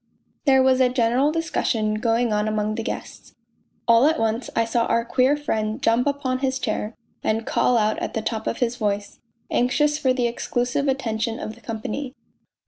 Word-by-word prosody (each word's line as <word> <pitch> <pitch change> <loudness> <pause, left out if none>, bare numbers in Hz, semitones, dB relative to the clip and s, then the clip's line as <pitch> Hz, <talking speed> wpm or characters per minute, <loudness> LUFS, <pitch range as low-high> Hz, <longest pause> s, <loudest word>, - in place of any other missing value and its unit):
There 265 -2 +5
was 260 0 +4
a 255 - +5
general 250 +3 +2
discussion 245 -9 0
going 230 0 +1
on 210 0 +1
among 215 0 0
the 225 - -3
guests - - -7 0.5
All 230 +4 +6
at 320 +1 +2
once 225 +2 -1
I 230 - +2
saw 230 +1 0
our 230 0 +1
queer 260 +4 +2
friend 220 -7 -2
jump 230 +4 +2
upon 275 -3 -1
his 265 -1 0
chair, 220 -3 -3 0.3
and 225 +1 0
call 245 - +2
out 215 -1 +1
at - - -4
the 220 - -2
top 220 -1 -3
of - - -1
his 245 -1 -1
voice, 205 -2 -2 0.3
anxious 295 +5 +2
for 260 - +2
the 255 -1 +1
exclusive 245 +3 -1
attention 230 -4 -1
of 215 - -5
the 235 - -18
company. 225 +5 -5
235 Hz, 185 wpm, -23 LUFS, 220-260 Hz, 0.5 s, All